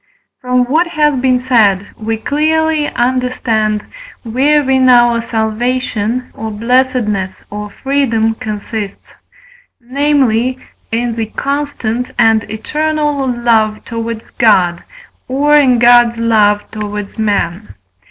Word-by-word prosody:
From 250 0 +1
what 315 +8 +1
has 300 -5 +1
been 255 0 +2
said 215 -6 +2
we 225 0 -3
clearly 310 +4 0
understand, 240 -4 -1 0.4
wherein 265 +2 +2
our 240 -1 +4
salvation, 230 +1 -2
or 220 0 -6
blessedness, 220 -4 0 0.2
or 210 0 -6
freedom, 230 -3 0
consists: 210 -1 -6 0.7
namely, 255 -2 +1 0.3
in 235 +1 -1
the 225 -1 -2
constant 260 -2 -3
and 225 -1 +2
eternal 295 +4 -1
love 230 -3 +1
towards 230 -1 -5
God, 180 -7 +3 0.5
or 285 +3 +2
in 265 -4 +4
God's 240 0 +5
love 215 -3 +2
towards 210 -1 -6
men. 205 - -2
235 Hz, 105 wpm, -14 LUFS, 220-260 Hz, 0.7 s, God's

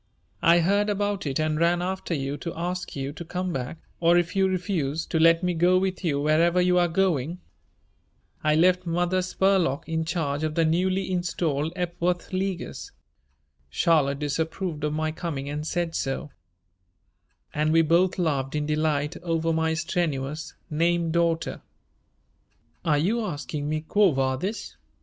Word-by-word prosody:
"I 170 +1 +5
heard 200 +4 +2
about 205 -3 -1
it 135 +1 -1
and 155 0 0
ran 170 +1 +3
after 185 -1 -2
you 135 0 -2
to 170 - -6
ask 180 +1 -3
you 135 0 -4
to 170 - -7
come 180 +1 -3
back 135 +4 -4 0.2
or, 170 +1 +4
if 175 +1 0
you 195 0 +3
refused, 175 -5 -2
to 160 - +1
let 165 +2 +5
me 180 0 +1
go 175 +2 +4
with 190 0 -1
you 145 -5 +1
wherever 165 +4 +3
you 180 0 +4
are 175 - +3
going. 170 -2 0 1.0
I 155 0 +3
left 180 +2 +3
Mother 175 +2 +1
Spurlock 185 -6 +1
in 160 0 -1
charge 160 -3 -2
of 155 -1 -2
the 165 - +3
newly 185 +4 +1
installed 165 -4 -1
Epworth 175 0 -2
Leaguers. 185 -1 -3 0.8
Charlotte 140 - +2
disapproved 155 +2 -3
of 150 - 0
my 155 0 -1
coming 150 -4 -4
and 150 +2 -4
said 170 -1 -1
so," 135 0 -3 1.2
and 155 +1 +1
we 165 0 +5
both 170 +4 +3
laughed 140 -6 -1
in 150 0 0
delight 150 +1 0
over 165 -1 0
my 160 0 +1
strenuous 155 -2 -2 0.2
name 170 +1 +1
daughter. 170 -1 0 1.2
"Are 155 -3 +2
you 215 +10 +1
asking 150 -5 -4
me 155 0 -2
_quo 205 -7 +4
vadis? 135 +11 -2
165 Hz, 155 wpm, -26 LUFS, 150-180 Hz, 1.2 s, I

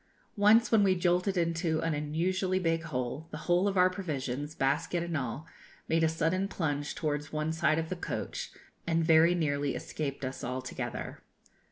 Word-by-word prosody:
Once, 215 +2 +5
when 220 -2 +6
we 190 -2 +4
jolted 180 +2 +1
into 165 -1 0
an 165 -1 0
unusually 180 +6 0
big 165 -3 +1
hole, 130 +3 -3
the - - -6
whole 175 +3 +3
of 195 -1 -1
our 180 0 +6
provisions, 150 -6 -4
basket 150 +5 0
and 170 -1 -3
all, 135 +2 -3 0.4
made 165 0 +2
a 160 - +4
sudden 165 +4 0
plunge 145 -6 -2
towards 150 -1 -2
one 155 +1 -1
side 155 -1 +2
of 160 0 -2
the 185 - -2
coach, 175 - -4 0.4
and 165 -1 +2
very 165 +2 +6
nearly 145 -4 0
escaped 140 -3 -4
us 130 +1 -5
altogether. 130 +1 -5
160 Hz, 170 wpm, -30 LUFS, 145-180 Hz, 0.4 s, when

